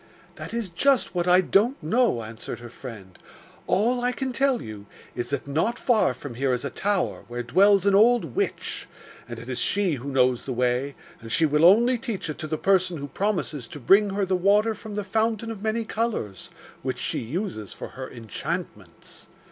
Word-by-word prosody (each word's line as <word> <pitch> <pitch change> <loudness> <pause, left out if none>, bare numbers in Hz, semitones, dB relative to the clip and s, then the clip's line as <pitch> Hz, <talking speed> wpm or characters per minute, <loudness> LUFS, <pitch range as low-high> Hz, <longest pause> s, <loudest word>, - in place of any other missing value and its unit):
'That - - -7
is 230 -6 -3
just 270 +8 +2
what 175 -1 -1
I 180 +1 +6
don't 215 +8 +2
know,' 200 - +2
answered 110 +1 -6
her 120 -1 -10
friend. 105 -9 -10 0.5
'All 240 +6 +2
I 245 +1 +1
can 260 +1 -3
tell 270 0 +2
you 105 -2 -9 0.3
is 120 -1 -4
that 140 - -2
not 160 +12 0
far 220 - +2
from 135 0 -8
here 130 +2 0
is 125 +2 -2
a 140 - -3
tower, 200 +3 -1
where 120 +1 -4
dwells 195 - +4
an 200 - +4
old 215 - +4
witch, - - -2 0.4
and 120 - -6
it 115 +1 -10
is 130 -2 -3
she 200 -4 +1
who 130 +3 -6
knows 130 -2 +2
the 130 - -2
way, 125 +3 0 0.2
and 115 -1 -10
she 165 - +3
will 150 +1 +2
only 235 +7 +5
teach 220 -10 -4
it - - -9
to 155 - -4
the 155 0 -2
person 185 -1 +2
who 140 -1 -6
promises 170 - -2
to 145 - -9
bring 200 - +5
her 195 0 0
the 190 0 +1
water 205 +4 +3
from 215 -1 -9
the 210 - -2
fountain 225 +2 -1
of 215 -3 -8
many 220 +1 -1
colours, 215 - -3 0.3
which - - -3
she - - -2
uses 130 - -4
for - - -7
her 130 0 -8
enchantments. 115 - -6
180 Hz, 200 wpm, -25 LUFS, -, 0.5 s, I